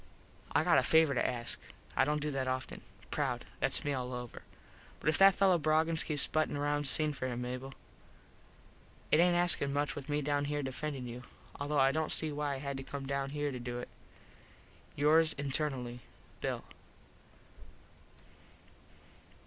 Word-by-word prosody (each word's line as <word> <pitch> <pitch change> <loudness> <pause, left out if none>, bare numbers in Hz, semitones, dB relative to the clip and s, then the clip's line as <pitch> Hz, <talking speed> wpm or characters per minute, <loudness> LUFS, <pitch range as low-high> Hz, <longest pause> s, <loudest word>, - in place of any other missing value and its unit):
I - - +4
got - - +5
a - - +3
favor 160 -3 +4
to 125 - +1
ask. 120 -2 +1 0.4
I 130 - +4
dont 150 +1 0
do 150 - -1
that 135 -2 -2
offen. 130 0 -3 0.3
Proud. - - -1
Thats - - +1
me 145 - 0
all 125 -1 -3
over. 125 -1 -7 0.6
But - - 0
if 155 - +3
that 195 -1 +8
fello 190 -3 +4
Broggins 160 +2 +2
keeps 150 -3 0
buttin 155 -2 0
round 145 0 0
sing 155 +2 +3
for 130 -2 -3
him 125 -1 -3
Mable. 130 +2 -5 1.4
It 155 - +5
aint 175 0 +5
askin 175 -5 +1
much 145 +1 -1
with 145 0 -8
me 145 0 0
down 145 0 0
here 145 0 -2
defendin 135 0 -4
you. 120 +1 -7 0.4
Although 145 +1 -1
I 135 0 +5
dont 155 +1 -1
see 155 -1 +1
why 145 -1 -2
I - - -4
had 140 0 -4
to 135 - -6
come 140 0 -6
down 140 0 -2
here 145 0 -2
to 125 - -5
do 120 0 -5
it. 120 - -6 1.1
Yours 155 +2 +4
internally, 135 -3 -2 0.4
_Bill. - - -2
145 Hz, 170 wpm, -33 LUFS, 130-150 Hz, 1.4 s, that